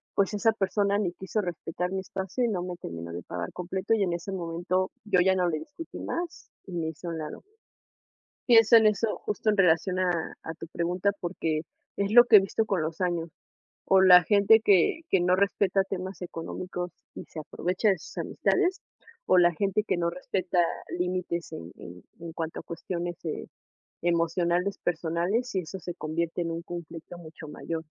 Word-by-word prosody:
pues 200 +1 +2
esa 225 +2 +3
persona 200 -1 +1
ni 190 -5 0
quiso 190 +4 -2
respetar 180 0 -4
mi 190 - -1
espacio 190 +5 -3
y - - +3
no 190 -5 -1
me 180 -1 -5
terminó 85 - -7
de 85 0 -6
pagar 90 +1 -5
completo, 190 +4 -2
y 210 - +1
en 175 -3 0
ese 170 +3 -5
momento 180 +1 -1
yo 200 -4 +3
ya 190 +1 +4
no 180 -1 +2
le 155 - -1
discutí 320 - -9
más, 345 0 -5 0.2
y 185 - -8
me 165 -2 -2
hice 160 +2 -9
a - - -2
un 165 - -4
lado. 150 -1 -6 1.1
Pienso 230 -1 +7
en 220 -1 +6
eso 215 +1 +1
justo 210 +1 -2
en 210 - +4
relación 180 0 +3
a 175 -3 0
a 160 - -5
tu 165 - -9
pregunta, 180 +4 0
porque 160 -3 -2 0.3
es 200 +1 -1
lo 240 +1 +9
que 225 - +8
he - - +9
visto 195 +3 -1
con 195 -6 0
los 160 +2 -4
años, 170 -2 -1 0.6
con 190 0 +5
la 180 -1 +9
gente 205 +4 +5
que 205 - +4
que 190 - +5
no 180 +1 +3
respeta 195 0 +2
temas 190 -1 -5
económicos 180 +1 -5 0.2
y - - -8
se 160 - -9
aprovecha 180 +6 -1
de 190 -3 +2
sus - - -12
amistades, 380 -1 0 0.5
o - - +5
la 175 -1 +5
gente 200 +4 0
que 210 - 0
no 170 0 +1
respeta 180 +1 -3 0.4
límites 180 -1 -2
en 85 +1 -8
en 90 +1 -11 0.2
en 170 -1 -8
cuanto 160 0 -4
a - - -28
cuestiones, 175 0 -5
eh, 155 - -3 0.6
emocionales, 175 +3 +1
personales 175 +8 -1
y 190 - +2
eso 180 +3 -7
se 175 0 -6
convierte 165 +1 -2
en 165 - -2
un 165 0 -3
conflicto 170 0 -8
mucho 160 -2 -11
mayor. 160 +2 -5
180 Hz, 195 wpm, -27 LUFS, 170-195 Hz, 1.1 s, lo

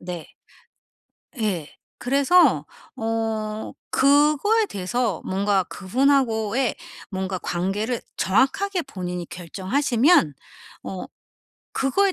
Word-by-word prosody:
네. 175 -2 -7 1.1
예. 180 -9 -1 0.3
그래서 280 +8 +4 0.3
어 225 -2 -2 0.2
그거에 300 +11 +4
대해서 205 - -2
뭔가 195 0 +1
그분하고의 235 +2 +1 0.4
뭔가 190 -1 -3
관계를 200 +8 -2
정확하게 325 - +1
본인이 180 -8 -5
결정하시면 225 - +2 0.5
어 190 - -6 0.7
그거에 380 +9 +2
225 Hz, 200 characters per minute, -23 LUFS, 190-275 Hz, 1.1 s, 그래서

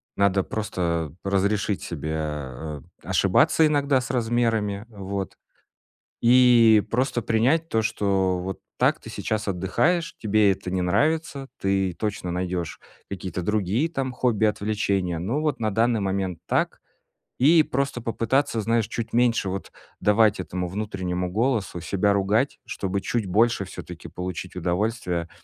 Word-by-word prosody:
надо 100 -1 +2
просто 85 -8 -2
разрешить 100 +1 0
себе, 80 -1 -4
э, 75 -1 -4 0.2
ошибаться 160 - +3
иногда 145 -3 +2
с 125 - -4
размерами, 115 -4 0
вот, 100 -3 -5 0.8
и 120 -3 +6
просто 125 0 0
принять 130 +10 +2
то, 110 - +1
что 95 -3 +1
вот 95 +2 -5 0.2
так - - +2
ты - - -11
сейчас 110 -1 -3
отдыхаешь, 100 - 0
тебе 105 -1 +3
это 95 -1 -4
не 95 - 0
нравится, 140 - 0
ты 95 -1 +1
точно 100 -2 -3
найдёшь 90 -1 -3 0.3
какие-то 95 -1 -4
другие 105 - 0
там 135 -5 -2
хобби, 120 -4 +1
отвлечения, 100 -4 0
ну, 115 - -1
вот 150 -5 -1
на 110 -2 0
данный 115 +1 +2
момент 95 -3 -2
так. - - 0 0.6
И 155 +5 +6
просто 135 -3 -2
попытаться, 115 +2 0
знаешь, 115 0 +1
чуть 115 -1 -5
меньше 115 -4 +2
вот 95 +1 -5 0.3
давать 105 0 +4
этому 90 0 -3
внутреннему 90 -2 -3
голосу 110 -4 0
себя 100 +4 +1
ругать, 110 +8 +1
чтобы 95 0 -3
чуть 115 +2 -1
больше 110 +3 +2
всё-таки 90 -2 -9
получить 90 0 -6
удовольствия 90 -1 -1
105 Hz, 135 wpm, -24 LUFS, 95-115 Hz, 0.8 s, и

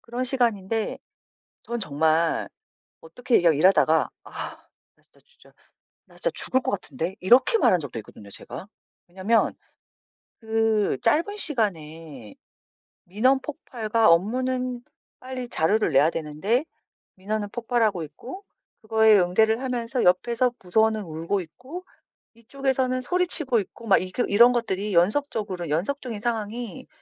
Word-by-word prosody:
그런 245 +2 -4
시간인데 225 -4 -1 0.7
저는 235 0 -4
정말 160 -1 +1 0.5
어떻게 235 +9 -1
이러 170 -2 +4
일하다가 160 0 +3 0.2
"아. - - -13 0.7
나 - - -33
진짜 - - -28
진짜 485 - -22 0.5
나 - - -22
진짜 - - -1
죽을 260 - 0
것 - - -1
같은데." 175 0 -4
이렇게 250 - +5
말한 180 - +3
적도 130 -5 -6
있거든요, 100 -1 -14
제가. 125 - -6 0.4
왜냐하면 195 +6 +1 0.9
그 220 -2 +1
짧은 335 - +1
시간에 160 - -3 0.7
민원 255 +9 +2
폭발과 230 - -1
업무는 250 +7 0 0.4
빨리 255 -1 -6
자료를 195 0 +1
내야 145 +5 +5
되는데 165 - -1 0.5
민원은 205 +2 -3
폭발하고 225 -5 0
있고 250 - -10 0.4
그거에 220 -1 +4
응대를 220 +6 +2
하면서 250 -1 -2
옆에서 235 +8 +2
부서원은 220 +3 +1
울고 165 +4 -3
있고 265 - -10 0.5
이쪽에서는 255 +2 -1
소리치고 320 -6 +2
있고 230 +4 -10
막 195 - +5
이 185 0 -7
그 245 - 0
이런 235 +5 +6
것들이 210 -4 -2
연속적으로 195 - 0
연속적인 225 - -2
상황이 225 -1 -4
220 Hz, 300 characters per minute, -24 LUFS, 180-250 Hz, 0.9 s, 이런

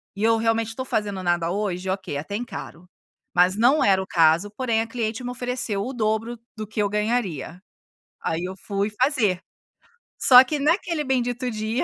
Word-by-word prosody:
e 205 - -4
eu 225 0 +4
realmente 225 0 0
tô 260 - -3
fazendo 205 -6 -2
nada 175 -1 0
hoje, 190 -2 -2
ok, 185 -6 -3
até 160 +8 -5
encaro. 180 -6 -7 0.5
Mas 180 +2 +4
não 250 +7 +4
era 190 -1 +4
o 190 - -7
caso, 165 +4 +3
porém 225 0 0
a 225 - -3
cliente 230 0 -3
me 245 - -4
ofereceu 245 -5 -2
o 265 - -5
dobro 225 +1 -1 0.2
do 215 - -4
que 210 0 -3
eu 205 - +1
ganharia. 205 - -2 0.6
Aí, 165 +2 -2
eu 185 +1 -5
fui 200 +1 -2
fazer. 220 - +2 0.8
Só 255 0 +9
que 295 +2 -3
naquele 325 +1 +1
bendito 245 -1 -1
dia, 220 +2 -2
215 Hz, 180 wpm, -24 LUFS, 190-245 Hz, 0.8 s, Só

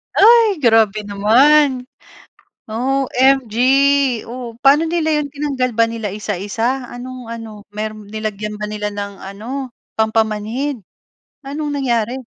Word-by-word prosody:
Ay, 435 -5 +5
grabe 220 -3 +3
naman. 250 +6 +3 0.8
OMG, 260 0 +1 0.7
oh, 240 -1 -7
paano 295 +4 +5
nila 320 -2 +1
'yon, 290 - -4
tinanggal 280 -3 -2
ba 230 - +5
nila 230 -2 -4
isa-isa? 215 +6 -3
Anong 250 0 -8
ano, 220 -3 -8
meron 215 0 -6
nilagyan 210 -1 -4
ba 210 - -4
nila 210 0 -3
ng 200 -1 -6
ano, 240 +7 -6 0.2
pampamanhid? 220 +4 -1 0.7
Anong 295 +2 -4
nangyari? 250 -2 -1
235 Hz, 110 wpm, -18 LUFS, 215-270 Hz, 0.8 s, Ay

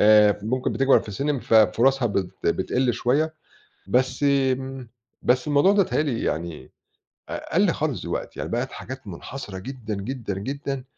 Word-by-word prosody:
آآ 105 -1 +6
ممكن 125 +4 -1
بتكبر 135 0 +4
في - - -12
السِن 140 +9 -1
مف 120 -3 -1
فرصها 120 +5 +4
بت 95 -3 -1 0.2
بتقل 125 -1 +1
شوية، 150 +8 +1 0.5
بس 130 +6 +1
امم 135 -2 +1 0.3
بس 125 0 +2
الموضوع 150 +6 +4
ده 205 -1 +5
بيتهيأ 160 - 0
لي 135 -7 -2
يعني 85 -1 -3 0.6
أ - - -6
قَل - - +4
خالص - - -2
دلوقتي - - -4
يعني - - -4
بقت - - -1
حاجات 130 -2 -8
منحصرة 100 +3 -7
جدًا، 120 0 -6
جدًا، 110 +1 -4
جدًا 135 +3 -4
130 Hz, 160 wpm, -24 LUFS, 105-135 Hz, 0.6 s, آآ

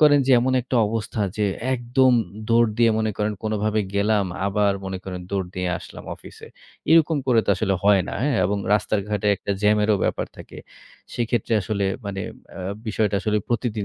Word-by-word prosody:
করেন 150 -1 +6
যে - - +2
এমন 130 +2 +1
একটা 125 +1 -2
অবস্থা 110 +1 -3 0.2
যে, 105 - +1 0.3
একদম 125 +1 +2 0.4
দৌড় 115 0 +4
দিয়ে 115 -1 +5
মনে 110 0 0
করেন 105 0 0
কোনোভাবে 110 0 0
গেলাম, 100 0 +2 0.2
আবার 100 0 +2
মনে 95 0 -4
করেন 90 -1 -5
দৌড় 95 -2 -1
দিয়ে 90 0 -2
আসলাম - - -11
অফিসে। - - -13 0.4
এরকম 160 -1 +5
করে 120 -3 +4
তো - - +3
আসলে 95 +1 0
হয় 100 -1 +5
না, - - -5
হ্যাঁ? 140 -2 +1
এবং 100 +3 0
রাস্তার 105 0 +1
ঘাটে 105 0 -1
একটা 100 - -6
জ্যামেরও 105 0 +3
ব্যাপার - - -1
থাকে। - - -11 0.6
সেক্ষেত্রে 120 -1 -1
আসলে 100 -1 -2 0.2
মানে 95 -1 -4 0.4
আ - - -5 0.3
বিষয়টা 105 -1 0
আসলে 105 0 0
প্রতিদিন 115 -3 -1
105 Hz, 180 wpm, -23 LUFS, 100-120 Hz, 0.6 s, করেন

